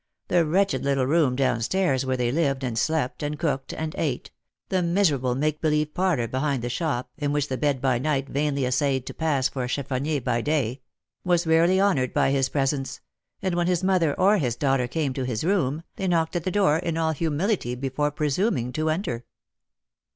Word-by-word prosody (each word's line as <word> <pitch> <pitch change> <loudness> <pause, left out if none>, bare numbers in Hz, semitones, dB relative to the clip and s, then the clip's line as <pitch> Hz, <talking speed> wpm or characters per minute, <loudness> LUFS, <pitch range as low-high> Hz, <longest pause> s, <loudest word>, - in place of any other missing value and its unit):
The 170 -3 +3
wretched 195 +5 +1
little 135 -2 +1
room 145 -2 +2
down 125 -3 +1
stairs, 135 -2 +1
where 130 0 0
they 120 -1 0
lived, 140 -3 0
and 120 -3 -2
slept, 145 +2 -1
and 150 0 -3
cooked, 140 -4 -2
and 155 0 -4
ate, 140 -6 -2 0.2
— - - -57
the 185 -1 +1
miserable 165 -9 +1
make 150 +2 -1
believe 150 -1 +1
parlour 175 -11 +1
behind 130 +1 -1
the 120 - -2
shop, 130 -3 -2
in 145 -1 0
which 145 -1 0
the 130 - -2
bed 145 -3 +1
by 130 -2 +1
night 140 0 0
vainly 140 -1 0
essayed 130 0 0
to - - -6
pass 145 -5 +1
for 130 -1 -4
a - - -2
cheffonier 140 +3 -1
by 120 -2 -1
day, 135 -3 -1 0.2
— - - -61
was 175 -1 +2
rarley 165 +3 +4
honoured 145 -11 +1
by - - +3
his 135 -1 +1
presence, 135 0 -1 0.4
and 190 -2 0
when 175 0 +1
his 180 -1 +1
mother 180 -6 +2
or 200 +3 +4
his 125 -6 0
daughter 135 -1 +1
came 140 +1 -1
to 130 - -3
his 125 -2 -2
room, 165 -5 0
they 190 - -2
knocked 165 -1 +1
at 170 - -2
the - - +1
door 185 -6 +3
in 165 -2 -2
all 160 -1 +1
humility 160 - -1
before 135 +3 -1
presuming 145 - -1
to 155 0 0
enter. 155 - -2
145 Hz, 205 wpm, -25 LUFS, 130-165 Hz, 0.4 s, rarley